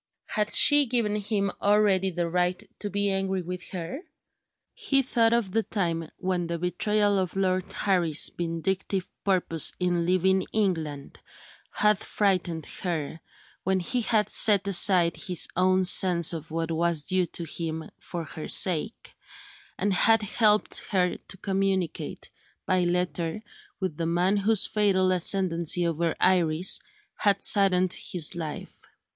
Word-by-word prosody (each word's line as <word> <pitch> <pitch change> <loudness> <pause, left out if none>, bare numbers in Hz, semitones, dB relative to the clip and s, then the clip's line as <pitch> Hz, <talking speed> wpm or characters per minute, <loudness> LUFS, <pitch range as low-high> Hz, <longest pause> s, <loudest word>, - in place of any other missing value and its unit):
Had 210 -1 0
she 290 -2 +7
given 225 -3 +1
him 200 -1 -1
already 200 -2 +2
the 175 -1 -3
right 180 +2 -1 0.2
to 205 - -3
be 200 0 -1
angry 190 -1 -2
with 180 +1 -7
her? 175 - -6 0.7
He 285 - +1
thought 230 -3 +2
of 235 -5 0
the 225 - +1
time, 170 -7 -3
when 180 -2 -2
the 170 0 -3
betrayal 205 +4 0
of 185 -1 -3
Lord 185 -1 -1
Harry's 175 -6 +1
vindictive 175 +3 -3 0.2
purpose 180 -5 +1
in 175 -2 -1
leaving 190 +1 +1
England 160 -9 -2 0.5
had 210 -1 +1
frightened 180 -6 -1 0.2
her 165 -3 -4 0.4
when 190 0 0
he 245 +8 -2
had 220 -2 0
set 200 -2 +4
aside 180 -3 +4
his 180 -5 0
own 185 +1 +2
sense 175 -2 +4
of 160 -1 -7
what 165 +1 -3
was 165 -1 0
due 185 +2 0
to 170 - -6
him, 160 -1 -5
for 170 -1 -7
her 155 0 -8
sake 185 +4 -1 0.6
and 205 - 0
had 225 +3 +3
helped 210 0 +1
her 180 -3 0
to 190 - -10
communicate, 190 -3 -3 0.3
by 185 -1 +1
letter, 175 +1 -2 0.4
with 185 -6 -4
the 165 -1 -2
man 180 +4 +1
whose 205 +1 +3
fatal 195 -3 +1
ascendency 175 -2 +1
over 165 0 -1
Iris 175 -1 +2 0.4
had 200 -1 +1
saddened 185 -3 +3
his 170 -5 -2
life. 160 -3 -7
185 Hz, 140 wpm, -26 LUFS, 170-200 Hz, 0.7 s, she